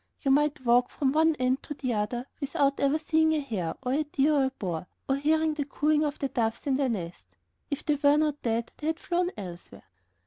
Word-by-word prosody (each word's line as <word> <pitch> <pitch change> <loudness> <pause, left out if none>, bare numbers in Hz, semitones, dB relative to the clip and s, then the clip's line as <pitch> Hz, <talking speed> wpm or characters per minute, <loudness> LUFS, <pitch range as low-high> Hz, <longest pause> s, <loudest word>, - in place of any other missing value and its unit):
You 275 - +2
might 290 -1 +2
walk 245 +1 +4
from 270 -2 0
one 320 +2 +3
end 255 0 0
to 295 - -7
the 255 -3 -2
other 225 +4 -2
without 280 -1 0
ever 280 +2 +2
seeing 315 0 +2
a 310 - +1
hare, 210 - -3
or 250 0 0
a 300 +3 +2
deer, 295 0 +1
or 280 -2 +3
a - - +1
boar, 180 -9 -5 0.2
or 270 - +2
hearing 315 +2 +2
the 300 -1 -2
cooing 300 +2 +1
of 295 -1 -2
the 275 - -1
doves 230 -4 -2
in 275 -2 +1
their 275 -2 +1
nest. 175 - -5 0.4
If 285 - -4
they 300 - +3
were 290 0 +4
not 300 -1 0
dead, 230 0 -1
they 300 - -5
had 320 +1 -1
flown 355 0 0
elsewhere. 180 -4 -9
275 Hz, 230 wpm, -28 LUFS, 245-300 Hz, 0.4 s, walk